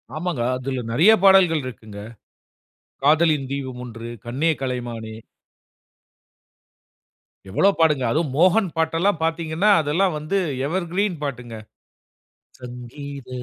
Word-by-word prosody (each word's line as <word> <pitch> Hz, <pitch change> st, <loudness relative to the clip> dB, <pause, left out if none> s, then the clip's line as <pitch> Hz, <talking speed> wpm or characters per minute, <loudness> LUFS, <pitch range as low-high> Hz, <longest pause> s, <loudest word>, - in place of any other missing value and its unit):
ஆமாங்க. 170 Hz, -5 st, -3 dB, 0.2 s
அதுல 130 Hz, -1 st, -4 dB
நிறைய 165 Hz, -, +5 dB
பாடல்கள் 180 Hz, -6 st, +5 dB
இருக்குங்க. 110 Hz, -4 st, -9 dB, 1.0 s
காதலின் 155 Hz, -2 st, +3 dB
தீபம் 130 Hz, -3 st, -5 dB
1, 115 Hz, 0 st, -8 dB, 0.2 s
கண்ணே 140 Hz, +8 st, 0 dB
கலைமானே! 120 Hz, -4 st, -5 dB, 2.3 s
எவ்ளோ 195 Hz, -, +3 dB
பாட்டுங்க. 150 Hz, -5 st, +3 dB
அதுவும் 155 Hz, -3 st, -1 dB
மோகன் 185 Hz, +4 st, +4 dB
பாட்டெல்லாம் 165 Hz, +3 st, +1 dB
பார்த்தீங்கன்னா, 165 Hz, +4 st, 0 dB
அதெல்லாம் 160 Hz, +4 st, 0 dB
வந்து 155 Hz, +6 st, -4 dB, 0.3 s
எவர்கிரீன் 185 Hz, +2 st, -1 dB
பாட்டுங்க. 125 Hz, -4 st, -5 dB, 1.1 s
சங்கீத 125 Hz, +2 st, -9 dB
150 Hz, 95 wpm, -22 LUFS, 125-170 Hz, 2.3 s, நிறைய